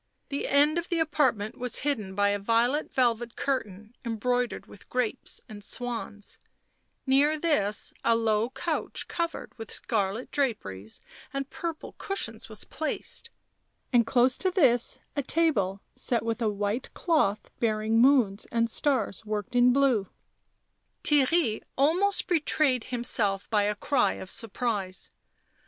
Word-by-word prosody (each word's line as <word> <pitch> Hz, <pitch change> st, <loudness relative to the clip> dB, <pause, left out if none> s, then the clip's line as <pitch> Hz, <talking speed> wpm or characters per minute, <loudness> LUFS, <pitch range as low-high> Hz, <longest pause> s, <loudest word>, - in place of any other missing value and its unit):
The 280 Hz, -, -2 dB
end 295 Hz, +4 st, +4 dB
of 340 Hz, -, -7 dB
the 345 Hz, -, 0 dB
apartment 265 Hz, -10 st, +1 dB
was 250 Hz, -2 st, -1 dB
hidden 215 Hz, -10 st, -1 dB
by 205 Hz, 0 st, +3 dB
a 205 Hz, 0 st, 0 dB
violet 235 Hz, +8 st, +1 dB
velvet 240 Hz, -2 st, +1 dB
curtain 215 Hz, -5 st, -3 dB
embre^iered 245 Hz, +2 st, -1 dB
w -, -, -26 dB
T -, -, -14 dB
ith 200 Hz, -, -16 dB
grapes 250 Hz, -3 st, -2 dB
and 205 Hz, -1 st, -8 dB
swans; 230 Hz, -4 st, -3 dB, 0.7 s
near 285 Hz, +3 st, +4 dB
this 215 Hz, -11 st, 0 dB
a 230 Hz, -, +4 dB
low 225 Hz, 0 st, +1 dB
couch -, -, -3 dB
covered 335 Hz, -1 st, -3 dB
with 225 Hz, -, -7 dB
scarlet 210 Hz, +2 st, -2 dB
draperies 110 Hz, -, -2 dB, 0.3 s
and 275 Hz, +1 st, -4 dB
purple 330 Hz, -2 st, -5 dB
cushions 230 Hz, -, -3 dB
was 215 Hz, -, -6 dB
placed, 315 Hz, +8 st, -3 dB, 0.6 s
and 235 Hz, -2 st, +5 dB
close 250 Hz, 0 st, +3 dB
to 375 Hz, -, +2 dB
this 265 Hz, -, +3 dB, 0.2 s
a 285 Hz, -, +1 dB
table, 240 Hz, -, +1 dB
set 240 Hz, -3 st, -1 dB
with 230 Hz, +1 st, -2 dB
a 220 Hz, -, +2 dB
white 205 Hz, +4 st, -2 dB
cloth 300 Hz, -, +1 dB
bearing 220 Hz, 0 st, +1 dB
moons 240 Hz, -7 st, +4 dB
and 230 Hz, -1 st, +1 dB
stars 250 Hz, -8 st, 0 dB
worked 215 Hz, +3 st, -4 dB
in 245 Hz, 0 st, +6 dB
blue. 250 Hz, -7 st, +3 dB, 1.0 s
Theirry 290 Hz, -4 st, +3 dB, 0.2 s
almost 355 Hz, +9 st, +3 dB
betrayed 300 Hz, -6 st, +1 dB
himself 225 Hz, -5 st, 0 dB
by 210 Hz, -2 st, +3 dB
a 210 Hz, 0 st, 0 dB
cry 270 Hz, +4 st, +2 dB
of 190 Hz, -, -8 dB
surprise. 205 Hz, -5 st, -2 dB
240 Hz, 140 wpm, -28 LUFS, 210-280 Hz, 1.0 s, in